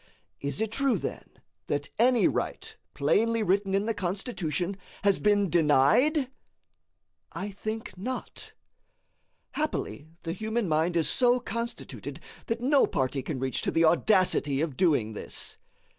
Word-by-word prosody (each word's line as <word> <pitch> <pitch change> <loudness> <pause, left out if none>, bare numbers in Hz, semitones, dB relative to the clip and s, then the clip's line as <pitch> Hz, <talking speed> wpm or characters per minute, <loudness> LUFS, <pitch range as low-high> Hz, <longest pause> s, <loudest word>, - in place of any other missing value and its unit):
Is 140 +6 -3
it 220 -1 -1
true, 270 -2 +2
then, - - -5 0.4
that 145 0 -2
any 245 0 +5
right, - - -3 0.2
plainly 230 0 +2
written 195 0 +1
in 200 +1 +1
the 225 - 0
Constitution, 185 - -2 0.3
has 200 -2 +3
been 205 -1 +3
denied? 175 - +4 1.1
I 200 +2 -4
think 215 +3 -5
not. 250 +8 -6 1.0
Happily 300 - -3 0.2
the 165 - -3
human 220 +2 -2
mind 160 +2 +1
is 165 -2 +2
so 250 -1 +3
constituted 235 0 -5 0.3
that 230 +1 -2
no 275 +2 +4
party 135 -1 -1
can 140 +2 -4
reach 130 0 -1
to - - -1
the 165 0 +3
audacity 170 -5 +3
of 155 -3 -1
doing 140 - +2
this. - - -3
195 Hz, 135 wpm, -28 LUFS, 160-230 Hz, 1.1 s, any